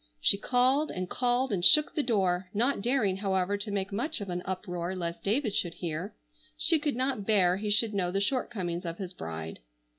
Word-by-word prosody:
She -, -, +4 dB
called 255 Hz, +7 st, +2 dB
and 185 Hz, 0 st, -4 dB
called 245 Hz, +2 st, 0 dB
and 180 Hz, -3 st, -1 dB
shook 300 Hz, +11 st, +6 dB
the 300 Hz, -, +1 dB
door, 190 Hz, -7 st, 0 dB
not 240 Hz, +1 st, +1 dB
daring, 220 Hz, -5 st, +1 dB
however, 195 Hz, -1 st, 0 dB
to 205 Hz, +2 st, -5 dB
make 200 Hz, 0 st, -2 dB
much 245 Hz, +11 st, -2 dB
of 200 Hz, -3 st, -5 dB
an 175 Hz, 0 st, -3 dB
uproar 185 Hz, -1 st, -4 dB
lest 170 Hz, -2 st, -4 dB
David 220 Hz, +1 st, 0 dB
should 175 Hz, -4 st, -1 dB
hear. 175 Hz, +3 st, -4 dB, 0.4 s
She 325 Hz, -2 st, +3 dB
could 295 Hz, -3 st, -1 dB
not 255 Hz, -5 st, -1 dB
bear 185 Hz, -4 st, +4 dB
he 210 Hz, +1 st, -3 dB
should 210 Hz, +1 st, +2 dB
know 185 Hz, -3 st, 0 dB
the 195 Hz, +2 st, -1 dB
shortcomings 200 Hz, -6 st, -2 dB
of 170 Hz, -1 st, -5 dB
his 190 Hz, -2 st, -6 dB
bride. 80 Hz, -, -6 dB
200 Hz, 200 wpm, -29 LUFS, 180-245 Hz, 0.4 s, shook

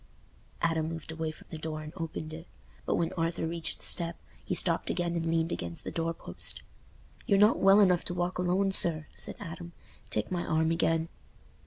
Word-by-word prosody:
Adam 160 Hz, -1 st, +2 dB
moved 165 Hz, -1 st, -5 dB
away 160 Hz, 0 st, -2 dB
from 155 Hz, -, -10 dB
the 160 Hz, -, -5 dB
door 155 Hz, -1 st, -4 dB
and 150 Hz, -, -8 dB
opened 160 Hz, -2 st, -4 dB
it, 165 Hz, +2 st, -8 dB, 0.4 s
but -, -, +3 dB
when 170 Hz, -, 0 dB
Arthur 165 Hz, -1 st, 0 dB
reached 165 Hz, 0 st, -1 dB
the -, -, -9 dB
step, 170 Hz, -1 st, -1 dB, 0.3 s
he -, -, -1 dB
stopped -, -, +1 dB
again 175 Hz, -1 st, 0 dB
and 165 Hz, -1 st, 0 dB
leaned 165 Hz, 0 st, +2 dB
against 85 Hz, -1 st, -3 dB
the -, -, -4 dB
door 165 Hz, 0 st, 0 dB
post. 165 Hz, -, -7 dB, 0.6 s
"You're 200 Hz, -, +5 dB
not 210 Hz, +3 st, +6 dB
well 195 Hz, +1 st, +7 dB
enough 180 Hz, -4 st, +5 dB
to 175 Hz, -, -2 dB
walk 175 Hz, +1 st, -1 dB
alone, 185 Hz, +2 st, +2 dB
sir," 160 Hz, -4 st, +2 dB
said -, -, -5 dB
Adam. 170 Hz, +1 st, -7 dB, 0.4 s
"Take 105 Hz, -, -1 dB
my 175 Hz, -1 st, 0 dB
arm 160 Hz, 0 st, +2 dB
again." 165 Hz, 0 st, +2 dB
165 Hz, 195 wpm, -30 LUFS, 160-175 Hz, 0.6 s, well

